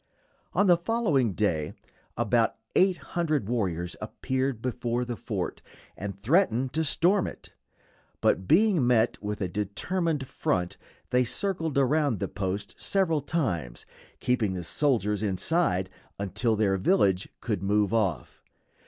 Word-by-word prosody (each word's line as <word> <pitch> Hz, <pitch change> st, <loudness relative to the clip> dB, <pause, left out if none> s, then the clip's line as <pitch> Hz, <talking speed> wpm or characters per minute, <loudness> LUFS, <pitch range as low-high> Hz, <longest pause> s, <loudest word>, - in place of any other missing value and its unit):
On 200 Hz, -, +3 dB
the 175 Hz, -3 st, +6 dB
following 170 Hz, -, +1 dB
day 85 Hz, -7 st, 0 dB, 0.4 s
about 120 Hz, 0 st, +2 dB, 0.2 s
eight 185 Hz, -1 st, +4 dB, 0.2 s
hundred 155 Hz, -, 0 dB
warriors 90 Hz, -7 st, -1 dB
appeared 130 Hz, -2 st, -2 dB
before 120 Hz, 0 st, -2 dB
the 120 Hz, -1 st, -4 dB
fort, -, -, -4 dB, 0.3 s
and 100 Hz, 0 st, -6 dB
threatened 130 Hz, -, +2 dB
to 160 Hz, +2 st, +1 dB
storm 180 Hz, +6 st, +3 dB
it; -, -, -10 dB, 0.7 s
but 95 Hz, -, +1 dB
being 180 Hz, -, +4 dB
met 120 Hz, -2 st, +2 dB
with 105 Hz, 0 st, -4 dB
a 95 Hz, -, 0 dB
determined 135 Hz, -, -2 dB
front 90 Hz, -7 st, -2 dB, 0.3 s
they 125 Hz, 0 st, +4 dB
circled 165 Hz, -, -1 dB
around 140 Hz, -, +2 dB
the -, -, -1 dB
post 100 Hz, +1 st, -4 dB
several 170 Hz, -6 st, +1 dB
times, 100 Hz, -, -2 dB, 0.3 s
keeping 115 Hz, -6 st, +1 dB
the 90 Hz, -1 st, -4 dB
soldiers 105 Hz, -, 0 dB
inside 95 Hz, -, +1 dB, 0.3 s
until 100 Hz, +4 st, 0 dB
their 100 Hz, -2 st, +2 dB
village 95 Hz, -, +2 dB
could 110 Hz, -6 st, -2 dB
move 105 Hz, +1 st, +1 dB
off. 95 Hz, -, -1 dB
120 Hz, 130 wpm, -27 LUFS, 100-155 Hz, 0.7 s, the